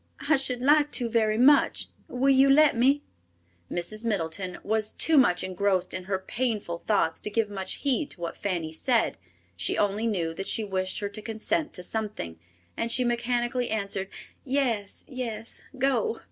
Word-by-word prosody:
I 315 - +7
should 260 -2 -2
like 295 +2 +4
to 240 -3 0
very 220 -2 +2
much. 280 +5 +4 0.2
Will 270 +2 +2
you 270 +1 +5
let 300 0 +6
me?" 270 +5 +3 0.7
Mrs. 195 +6 -2
Middleton 185 -3 -2
was 215 0 -1
too 325 - +2
much 185 -11 +4
engrossed 185 0 0
in 185 -1 -5
her 190 0 -1
painful 210 -4 -3
thoughts 180 -7 +1
to - - -4
give 210 0 0
much 190 -2 -3
heed 280 +1 +1
to 175 - -7
what 170 - -4
Fanny 175 -5 -2
said. 230 +8 +1 0.4
She 85 -1 0
only 205 +2 +1
knew 170 -7 -1
that 195 +4 -5
she 225 - +1
wished 185 -2 -1
her 205 - -2
to 210 +1 -7
consent 230 +9 -1
to 180 - -4
something, 200 - -4 0.4
and 230 - -2
she 250 - +3
mechanically 240 +1 0
answered, 200 -3 -2 0.4
"Yes, 250 -7 -1
yes, 230 -4 -6 0.2
go." 275 - +1
220 Hz, 170 wpm, -27 LUFS, 190-255 Hz, 0.7 s, I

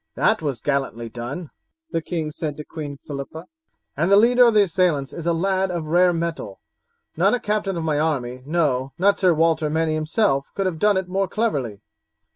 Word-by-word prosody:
"That - - +2
was 140 -7 -3
gallantly 135 -5 -2
done," 125 +8 -6 0.4
the 165 - -1
king 160 -2 -3
said 150 -1 -4
to 150 - -7
Queen 145 -3 -7
Philippa, 145 +3 -7 0.5
"and 165 +5 +1
the 200 - +6
leader 245 +3 +6
of 230 -2 +3
the 210 - +7
assailants 165 -7 0
is 170 0 -6
a - - +3
lad 190 +3 0
of 170 -3 -3
rare 175 +3 +4
mettle. 165 - -4 0.6
Not 195 +7 +3
a - - -3
captain 210 -4 -1
of 165 - -3
my 155 -2 0
army, 130 -5 -1
no, 140 -5 0
not 200 +3 +3
Sir 185 -2 +4
Walter 160 -1 +2
Manny 160 +1 0
himself, 155 -2 +1
could 195 - -1
have 175 -4 -2
done 210 +1 +3
it 190 -1 -2
more 195 +1 0
cleverly. 135 - -2
165 Hz, 195 wpm, -22 LUFS, 145-190 Hz, 0.6 s, the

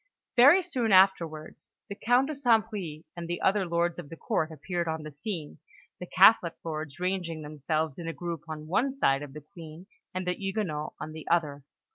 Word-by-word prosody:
Very 285 +10 +7
soon 255 - -1
afterwards, 170 -6 +2 0.2
the - - -5
Count 245 +5 +2
de - - -2
St. 240 -7 +3
Bris 165 -7 -6
and 170 -1 -6
the 175 0 -3
other 195 -1 +2
lords 170 0 0
of 145 - -8
the 165 - -9
Court 155 - -1
appeared 170 +3 -3
on 160 -1 -3
the 155 - -8
scene, 155 +1 -6 0.4
the 180 - -7
Catholic 185 -2 +5
lords 155 -2 -5
ranging 180 -4 -2
themselves 155 0 -2
in 165 - -6
a - - -1
group 170 -2 -5
on 155 -1 -6
one 245 - 0
side 135 - +2
of 145 -2 -8
the 150 - -8
Queen, 165 -1 -10 0.3
and 185 0 -4
the 180 - +1
Huguenots 190 -6 -3
on 155 +1 -6
the 155 0 -9
other. 150 -4 +1
170 Hz, 195 wpm, -28 LUFS, 155-195 Hz, 0.4 s, Very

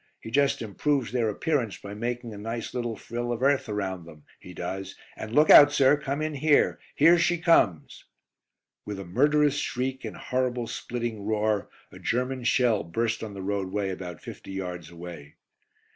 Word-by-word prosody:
He 110 - -9
just 140 -2 +2
improves 130 +4 -1
their 120 -3 +1
appearance 125 - -1
by 100 - -9
making 120 +1 -4
a - - -8
nice 115 +2 -5
little 120 -2 -2
frill 120 +3 -4
of 120 +1 -3
earth 140 -3 +2
around 95 -4 -3
them, 75 -3 -14 0.2
he 90 - -12
does, 95 +2 -5 0.2
and 110 - -7
look 150 +6 +5
out, 145 0 +10
sir; 140 -1 +5
come 145 0 -3
in 155 0 -2
here. 145 +1 +3 0.2
"Here 165 +4 +6
she 175 +1 +2
comes!" 160 - +2 0.8
With 105 -1 -6
a 100 - -6
murderous 145 - +2
shriek 130 +1 -3
and - - -6
horrible 125 -1 -1
splitting 115 -2 -4
roar 110 -1 0 0.2
a - - -12
German 125 +1 -1
shell 120 -5 +3
burst 115 +6 -2
on 105 -2 -7
the 95 - -6
roadway 100 0 -2
about 90 -3 -7
fifty 95 - -9
yards 90 -3 -5
away. 85 -4 -10
115 Hz, 175 wpm, -27 LUFS, 100-135 Hz, 0.8 s, out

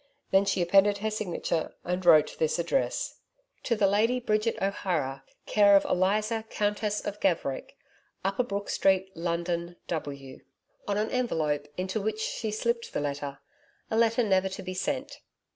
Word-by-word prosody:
The 195 +1 +5
she 195 -2 +1
appended 195 +3 +4
her 215 +2 -2
signature 175 -6 -2
and 180 +1 -2
wrote 160 -4 +6
this 160 +1 +1
address: 170 +10 -1 0.4
To 235 - 0
the 210 - +2
Lady 220 +6 +3
Bridget 215 -1 0
O'Hara, 175 -9 -1 0.2
Care 205 -1 +5
of 195 - +5
Eliza 215 +4 +1
Countess 210 0 -1
of 205 0 -4
Gaverick, 165 -9 -1 0.5
Upper 195 +5 +1
Brook 205 -4 -3
Street, 190 0 +2
London, 170 +1 -2
W. 140 -5 -5 0.5
on 200 0 0
an 215 +1 -1
envelope, 155 - 0
into 190 +3 -2
which 215 +1 -2
she 220 0 -2
slipped 235 +2 -1
her - - +1
letter 140 -1 -4 0.5
a - - +1
letter 230 +1 +3
never 190 -2 +2
to 190 - -7
be 185 0 -5
sent. 280 +8 -3
195 Hz, 155 wpm, -28 LUFS, 170-215 Hz, 0.5 s, wrote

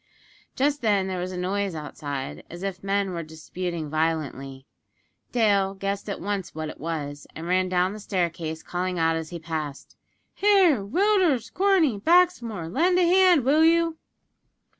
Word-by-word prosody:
Just 285 +2 +1
then 205 -4 +2
there 190 -1 -3
was 180 +1 -4
a 185 - -6
noise 190 0 -2
outside, 145 - -6
as 175 +2 -9
if 195 -1 -4
men 195 -1 0
were 170 -1 -3
disputing 165 +1 -5
violently. 145 -4 -2 0.7
Dale 200 -5 +2
guessed 200 +1 -3
at 200 - -4
once 195 -2 -4
what 155 -1 -4
it - - -10
was, 145 -2 -5
and 160 - -7
ran 185 +1 +1
down 180 +1 +1
the 215 - -8
staircase, 170 -5 -3
calling 180 0 -3
out 165 0 +2
as 160 -1 -4
he 175 - -6
passed: 155 -3 -6 0.4
"Here, 380 - +4
Willders, 355 - +1
Corney, 360 - +3
Baxmore, 245 - +2
lend 345 - +2
a 360 - +4
hand, 360 -6 +5
will 300 +4 +4
you?" 330 0 +3
190 Hz, 160 wpm, -25 LUFS, 165-265 Hz, 0.7 s, hand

